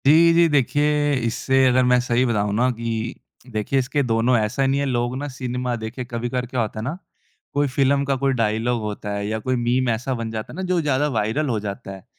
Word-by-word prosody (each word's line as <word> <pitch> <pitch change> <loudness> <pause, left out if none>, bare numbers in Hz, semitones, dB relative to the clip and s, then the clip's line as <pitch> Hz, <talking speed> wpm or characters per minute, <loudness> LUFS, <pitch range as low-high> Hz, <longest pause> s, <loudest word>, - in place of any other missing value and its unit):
जी, 165 +3 +7
जी, 170 0 +5
देखिए 145 +1 +2
इससे 130 +3 0
अगर 130 0 +4
मैं 125 0 +4
सही 120 0 +1
बताऊँ 105 -4 0
ना 125 +3 +3
कि 115 +1 -3 0.4
देखिए 110 +5 0
इसके 130 +3 0
दोनों 120 +1 +2
ऐसा 110 +5 0
नहीं 135 +1 +1
है 140 - 0
लोग 120 -1 -1
ना 145 +2 -4
सिनेमा 125 -1 -3
देखिए 115 +3 -6
कभी-कभार 120 +2 -2
क्या 125 0 -2
होता 110 -1 -3
है - - -4
ना, 145 +9 -3 0.6
कोई 145 0 +2
फ़िल्म 140 +1 +2
का 135 0 +1
कोई 135 +1 +1
डायलॉग 115 0 0
होता 105 -1 -5
है 100 0 -3
या 110 +1 -2
कोई 130 +4 -1
मीम 120 +1 +1
ऐसा 120 +4 -1
बन 115 -2 -4
जाता 110 -1 -5
है - - -9
ना 190 - -4
जो 180 - +2
ज़्यादा 145 -1 +1
वायरल 115 +8 0
हो 115 -3 0
जाता 100 -1 -6
है। 95 - -13
125 Hz, 225 wpm, -22 LUFS, 115-135 Hz, 0.6 s, जी